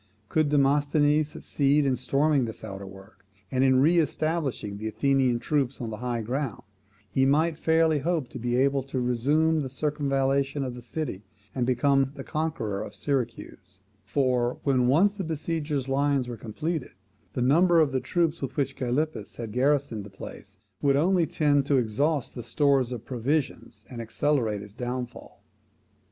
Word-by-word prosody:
Could 155 -2 +2
Demosthenes 145 +1 +3
succeed 145 0 +1
in 135 -2 +2
storming 135 +2 +2
this 110 - -8
outwork, 95 0 -10 0.3
and 130 0 +2
in 130 -1 +4
re 170 +4 +5
establishing 155 -9 -1
the 110 - -4
Athenian 130 +2 +2
troops 140 +1 -1
on 115 -2 -4
the 110 - -5
high 120 -1 -2
ground, 130 +1 -3 0.4
he 120 +8 +1
might 155 +4 +3
fairly 160 -1 +2
hope 160 -2 -1
to - - -8
be 120 +1 -1
able 135 +2 +2
to 135 0 -4
resume 145 +7 +2
the 135 - -4
circumvallation 140 -1 0
of 130 -2 -4
the 125 - -9
city, 120 -5 -4 0.3
and 125 -2 -1
become 135 +2 +2
the - - -7
conqueror 140 -11 -2
of 100 - -7
Syracuse: 115 -7 -4 0.2
for, 125 -3 0
when 130 -3 +2
once 175 +10 +4
the 200 -2 -4
besiegers' 155 -3 -2
lines 140 -1 +1
were 120 - -5
completed, 150 +8 -4 0.4
the 125 - -1
number 170 +6 +5
of 155 -3 +3
the 130 - 0
troops 165 +4 0
with 130 -1 -5
which 135 -2 0
Gylippus 130 -2 -2
had 115 -3 -6
garrisoned 130 -3 +1
the 105 - -10
place 100 0 -11 0.2
would 140 -1 +3
only 170 +3 +3
tend 145 -2 +2
to 140 - +3
exhaust 130 +5 0
the 120 - -6
stores 135 -1 +2
of 120 -2 -6
provisions, 135 +4 -2
and 120 -2 -7
accelerate 115 -3 0
its 100 -1 -13
downfall. 125 +1 -6
135 Hz, 165 wpm, -27 LUFS, 120-150 Hz, 0.4 s, re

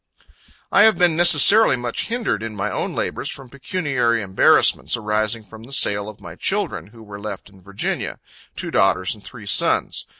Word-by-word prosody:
I - - +5
have 220 -4 +5
been 175 -2 +2
necessarily 175 +6 +6
much 120 -1 -4
hindered 230 - -2
in 110 -1 -6
my 105 +1 -3
own - - -4
labors, - - -3
from 135 -3 -8
pecuniary 135 - -2
embarrassments, 95 - +2
arising 110 +1 -1
from 110 +1 -14
the 120 +4 -14
sale 100 -5 +2
of 105 - -13
my - - -11
children, 80 - -3
who 110 +1 -16
were 100 -1 -10
left 100 -1 -8
in 95 -1 -20
Virginia 100 +2 -4 0.4
two - - -5
daughters 95 -1 +1
and 105 -2 -15
three 115 -5 -12
sons. 100 - +1
110 Hz, 175 wpm, -20 LUFS, 100-135 Hz, 0.4 s, necessarily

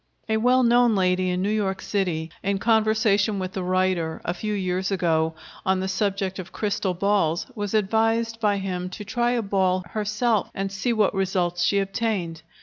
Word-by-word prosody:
A 220 0 +1
well 250 +3 +3
known 240 -1 +4
lady 185 -1 +2
in 180 +1 -1
New 205 - 0
York 195 -3 -1
City, 170 -6 -2
in 200 0 0
conversation 220 -1 +2
with 185 -1 -4
the 190 - -3
writer, 185 -3 0
a 175 - 0
few 210 +3 -3
years 185 -1 -1
ago, 160 -4 +1 0.3
on 190 0 +1
the 190 - -2
subject 195 -1 -1
of 185 0 -7
crystal 200 -3 -1
balls, 185 -3 +1
was 205 -2 -3
advised 225 +2 +1
by 210 -3 +2
him 185 -2 -3
to 210 - -8
try 240 +3 0
a 235 -2 0
ball 190 -2 +1
herself 215 0 0
and 195 0 -2
see 195 +5 -1
what 215 -3 +2
results 180 -2 0
she 200 - +2
obtained. 195 -4 -2
195 Hz, 180 wpm, -24 LUFS, 185-215 Hz, 0.3 s, known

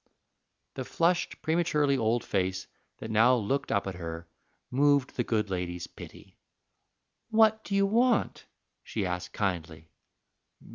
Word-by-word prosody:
The 130 - -4
flushed, 170 +6 0
prematurely 155 -4 +2
old 115 -1 +1
face 95 -1 -1 0.3
that 110 - -7
now 115 +4 +5
looked 125 +4 -1
up 100 -2 +1
at 95 - -4
her 85 -1 -7 0.4
moved 140 0 +2
the 120 - 0
good 105 -3 -1
lady's 90 -1 -3
pity. - - -13 0.9
"What 220 -1 +4
do 200 - -3
you 200 0 +4
want?" 235 +3 +1 0.4
she 105 -4 -3
asked 90 0 -4
kindly. 80 -5 -3
115 Hz, 130 wpm, -29 LUFS, -, 0.9 s, now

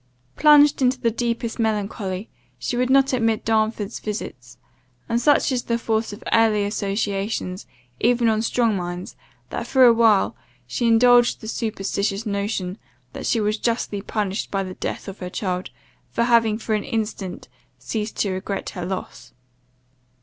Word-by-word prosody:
Plunged 295 -1 +6
in 255 - +5
the 250 -3 0
deepest 235 0 -2
melancholy, 205 -2 -2 0.3
she - - -3
would 250 +1 +1
not 270 0 +4
admit 225 -3 +1
Darnford's 220 -1 0
visits; 130 - -6 0.5
and 235 +1 0
such 290 +2 +3
is 250 -2 0
the 235 - 0
force 225 -1 -1
of 205 - -10
early 220 -2 +4
associations 200 -1 -2 0.3
even 240 0 +3
on 220 -1 +2
strong 230 -1 +1
minds, 175 -1 -5 0.4
that, 235 - -4
for 260 0 +4
a 235 - +8
while, 225 -3 +3 0.3
she 125 - -1
indulged 240 +1 +5
the 220 - -9
superstitious 205 -1 -2
notion 200 -2 -2 0.3
that - - -5
she 230 - +2
was 210 0 0
justly 230 -4 -1
punished 205 -1 -2
by 195 -1 -1
the 185 -1 -6
death - - -5
of 195 0 -8
her 180 - -5
child, 180 -1 -3 0.4
for 235 - 0
having 230 -3 +3
for 220 0 -3
an 210 -1 0
instant 215 -6 -4 0.3
ceased 215 -1 -4
to 200 - 0
regret 190 +1 -4
her 180 -1 -5
loss. 180 -9 -6
220 Hz, 155 wpm, -22 LUFS, 195-235 Hz, 0.5 s, a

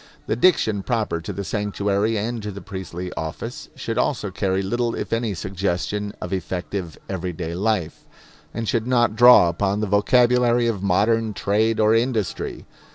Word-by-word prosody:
The - - 0
diction 115 - +3
proper 110 -7 -1
to - - -5
the 100 - -4
sanctuary 105 +1 -1
and 115 +2 -2
to 105 - -5
the 100 -1 -7
priestly 90 -2 -6
office 80 -1 -6
should - - -3
also - - -1
carry 95 0 -1
little 120 +4 -1
if - - -4
any 115 -3 -1
suggestion 95 +3 -2
of 90 - -5
effective 90 -1 -4
everyday 90 -3 -4
life, 95 -3 -2 0.4
and 115 -1 -4
should 115 +1 0
not 120 -3 +2
draw 120 -6 +8
upon 95 +4 0
the 105 - 0
vocabulary 120 +4 +3
of 110 -5 -1
modern 105 +3 +1
trade 110 +4 +1
or 110 0 +4
industry. 115 -4 -1
105 Hz, 160 wpm, -22 LUFS, 95-115 Hz, 0.4 s, draw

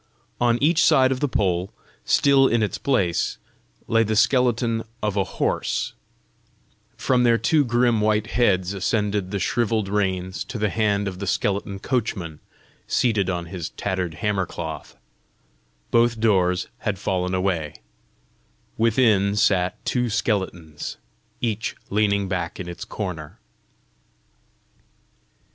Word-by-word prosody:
On 120 -1 +3
each 160 +1 +4
side 135 -5 +5
of 130 - -1
the 145 - +1
pole, 95 -6 0 0.3
still 140 -1 +4
in 115 -2 +2
its 105 - -2
place, 100 -11 0 0.5
lay 115 0 +3
the 110 -1 0
skeleton 115 0 +2 0.2
of 105 -2 0
a 100 - +2
horse; - - -1 1.0
from 125 -2 +2
their 120 -1 +4
two 155 +4 +3
grim 120 -2 +2
white 105 0 +2
heads 95 -6 +2
ascended 100 0 -1
the 100 - -2
shrivelled 110 0 0
reins 95 -2 -1
to 130 - -6
the 105 -2 0
hand 105 -2 +1
of 95 -2 -5
the 100 - -4
skeleton 100 +1 -1
coachman 95 - -2 0.5
seated 110 -6 +1
on 85 -2 -2
his 85 -1 -5
tattered 90 -4 -3
hammer 100 0 -1
cloth; 80 -7 -7 0.9
both 115 -1 +3
doors 95 -5 +2
had 105 -4 -2
fallen 90 -1 -1
away; 90 -5 -1 1.0
within 110 -4 +3
sat 95 -3 +1
two 125 -1 0
skeletons, 95 -8 -2 0.4
each 115 -2 -2 0.2
leaning 100 -1 +2
back 90 -3 -3
in 90 - -5
its 85 - -7
corner. 90 -8 -6
105 Hz, 125 wpm, -23 LUFS, 95-115 Hz, 1.0 s, side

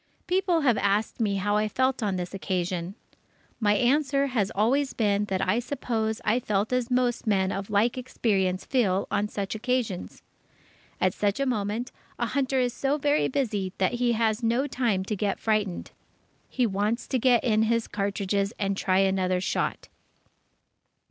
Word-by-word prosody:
People 360 -2 +1
have 245 -7 +3
asked 200 +4 0
me 210 -3 +1
how 205 +2 +1
I 215 0 +1
felt 260 +3 0
on 205 -3 0
this 180 0 -4
occasion. 185 -1 -2 0.6
My 210 -2 +3
answer 275 +3 +2
has 230 -8 0
always 260 +7 +2
been 205 -2 +1
that 190 -2 -1
I 210 +5 +2
suppose 230 -4 -2
I 220 +4 +3
felt 210 0 -1
as 250 -2 0
most 250 -2 0
men 190 -2 +2
of 195 +1 -4
like 220 +5 +2
experience 195 -7 -1
feel 200 -8 +1
on 205 +1 +1
such 200 -2 -4
occasions. 225 -4 -2 0.8
At 185 0 +2
such 205 +1 0
a 275 - +1
moment, 220 0 -2 0.3
a 240 - 0
hunter 265 +1 0
is 245 -1 +1
so 275 +2 0
very 290 +1 +2
busy 210 -9 -1
that 190 +4 +1
he 240 0 +1
has 220 0 +1
no 235 +4 +1
time 235 -9 0
to 210 - -2
get 200 0 -1
frightened. 210 -5 -1 0.6
He 250 - +1
wants 210 +3 -1
to 260 - 0
get 245 -1 +4
in 220 -3 +2
his 230 +1 +1
cartridges 200 0 -1
and 195 -1 -1
try 185 -1 +1
another 190 -1 +2
shot. 185 - -2
215 Hz, 170 wpm, -26 LUFS, 195-250 Hz, 0.8 s, get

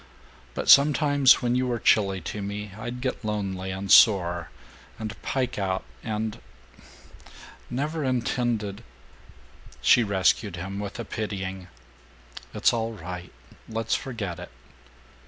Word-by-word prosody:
But - - -3
sometimes 145 -2 +6
when 120 0 +1
you 125 +1 +1
were 120 -1 -1
chilly 100 -4 +2
to 105 - -5
me 100 +1 -5
I'd 120 +3 -6
get 130 -1 -3
lonely 100 -3 -3
and 95 +1 -4
sore, 85 -6 +5 0.5
and 110 -1 -5
pike 130 -5 -2
out 95 -1 -1 0.2
and 110 -1 -3 1.3
Never 150 +5 -2
intended 120 -5 -1 0.5
" 65 +1 -23
She 120 - +6
rescued 100 -1 +1
him 95 +3 -5
with 100 -1 -5
a 115 - -4
pitying, 95 -4 -5 0.8
"It's - - +2
all 115 -1 -2
right. 90 -1 -8 0.4
Let's 115 0 -2
forget 110 -9 -3
it." - - -8
105 Hz, 125 wpm, -26 LUFS, 95-120 Hz, 1.3 s, sometimes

